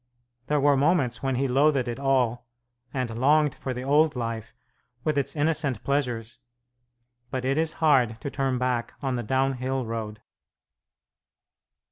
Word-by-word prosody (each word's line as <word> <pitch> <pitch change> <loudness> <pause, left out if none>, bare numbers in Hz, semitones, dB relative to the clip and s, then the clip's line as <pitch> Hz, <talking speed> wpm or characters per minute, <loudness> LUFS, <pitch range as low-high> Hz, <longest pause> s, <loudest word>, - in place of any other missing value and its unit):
There 150 0 +2
were 145 0 +4
moments 135 -4 +1
when 135 -1 0
he 135 +2 +1
loathed 135 0 +3
it 120 +2 -4
all, 125 -3 +1 0.4
and 120 -4 -3
longed 150 +1 +4
for 130 - -5
the 125 0 -4
old 150 +2 +3
life, 115 -2 -4 0.5
with 155 -2 0
its 140 +2 -1
innocent 145 -5 0
pleasures; 125 -5 -2 0.9
but 130 -1 -3
it 135 +1 +1
is 160 0 0
hard 130 -8 +2
to 140 - -4
turn 135 -2 0
back 125 -2 -1
on 135 -2 0
the 120 - -2
downhill 130 +1 -1
road. 110 -2 -5
130 Hz, 145 wpm, -26 LUFS, 120-145 Hz, 0.9 s, were